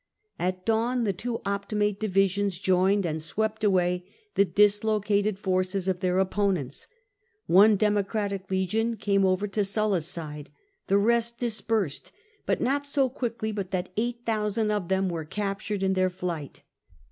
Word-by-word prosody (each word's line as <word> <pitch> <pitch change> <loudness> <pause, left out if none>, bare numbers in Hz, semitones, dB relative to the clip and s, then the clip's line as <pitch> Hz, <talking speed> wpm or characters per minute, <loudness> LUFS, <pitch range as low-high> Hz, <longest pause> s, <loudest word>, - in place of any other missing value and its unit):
At 185 +1 -2
dawn 235 +2 +1
the 200 -3 +1
two 230 +5 -4
Optimate 205 +1 -1
divi 195 -2 +3
sions 200 -1 -1
joined 190 +1 +2
and 160 -1 -2
swept 220 +6 -2
away 180 -3 +2 0.3
the 200 - +4
dislocated 210 0 +2
forces 185 -1 -1
of 185 -2 0
their 180 0 0
opponents: 190 -7 -1 0.6
one 205 +4 +6
Democratic 205 -1 -1
legion 215 +5 0
came 200 -2 +1
over 185 +2 +1
to 205 +1 0
Sulla's 195 -4 0
side; 155 -4 -6 0.4
the 200 - +3
rest 235 +2 +2
dispersed, 220 - -1 0.4
but - - +1
not 280 +3 0
so 275 -2 +2
quickly 230 -4 -3
but 200 -3 -4
that 185 -1 -2
8000 220 -2 -1
of 205 -4 -1
them 190 +1 +1
were 170 -3 -3
captured 200 +3 -3
in 190 0 +2
their 185 0 +2
flight. 175 -6 -5
200 Hz, 145 wpm, -27 LUFS, 185-215 Hz, 0.6 s, one